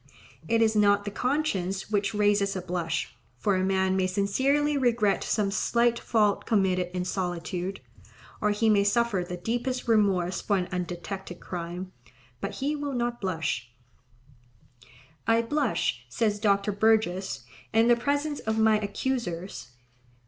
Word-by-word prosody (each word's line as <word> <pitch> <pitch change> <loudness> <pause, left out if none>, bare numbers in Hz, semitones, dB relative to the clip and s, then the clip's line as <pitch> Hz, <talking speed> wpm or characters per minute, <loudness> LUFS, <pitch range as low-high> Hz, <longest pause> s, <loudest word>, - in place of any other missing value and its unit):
It 230 0 +3
is 220 -1 +2
not 205 -1 +4
the 205 - -3
conscience 205 -8 -1
which 200 0 0
raises 205 -1 +2
a 190 - -2
blush, 170 -6 -3 0.2
for 200 +9 +1
a 185 - +1
man 190 0 +1
may 190 -1 +2
sincerely 265 +11 +1
regret 235 -7 +2
some 205 -3 0
slight 235 +3 +2
fault 210 -3 +1
committed 185 -4 +2
in 180 0 -1
solitude, 180 0 -3 0.6
or 210 - +2
he 210 +2 +1
may 205 -2 +5
suffer 205 -2 +1
the 180 0 -6
deepest 245 +7 -2
remorse 195 -5 +2
for 200 - +1
an 180 -1 -2
undetected 180 +1 -5
crime, 175 +1 -6 0.5
but - - -4
he 290 +3 -1
will 290 -1 -3
not 240 -1 -2
blush. 160 - -2 1.6
"I 230 0 +4
blush," 235 - 0
says 205 - 0
Dr. 200 -1 +2
Burgess, 195 - +1 0.3
"in 225 +1 +4
the 240 - +6
presence 285 +4 -1
of 220 0 -2
my 220 -1 +4
accusers." 200 - -3
205 Hz, 140 wpm, -27 LUFS, 185-230 Hz, 1.6 s, the